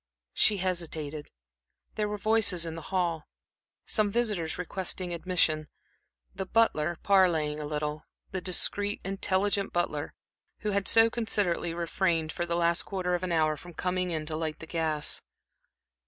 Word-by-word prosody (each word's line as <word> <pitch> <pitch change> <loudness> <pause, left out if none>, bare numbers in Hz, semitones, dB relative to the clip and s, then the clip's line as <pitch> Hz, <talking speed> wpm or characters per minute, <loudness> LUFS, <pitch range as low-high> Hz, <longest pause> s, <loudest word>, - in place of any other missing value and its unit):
She 210 - +4
hesitated. 160 -5 -3 0.6
There 210 -1 -1
were 210 - -3
voices 205 -5 +2
in 165 - -4
the 165 - -7
hall, 175 -4 -1 0.6
some 215 -2 +2
visitors 205 -8 0
requesting 180 0 -2
admission, 165 -3 +1 0.7
the 190 -1 -5
butler 175 -8 +2
parleying 165 -7 +3
a 150 - -4
little 150 0 -3 0.3
the 190 -2 -3
discreet, 200 +3 +1
intelligent 195 +1 0
butler, 155 -4 -1 0.5
who 210 - -1
had 200 -1 0
so 225 0 +7
considerately 205 -7 0
refrained, 170 -1 0
for 175 +2 -3
the 170 - -1
last 170 0 +2
quarter 185 -2 -2
of 175 - 0
an 185 -1 -2
hour, 155 -2 +2
from 175 +2 -12
coming 180 +1 -1
in 160 -2 -2
to 155 0 -2
light 155 -1 -3
the - - -9
gas. 160 -2 +1
175 Hz, 150 wpm, -29 LUFS, 160-195 Hz, 0.7 s, so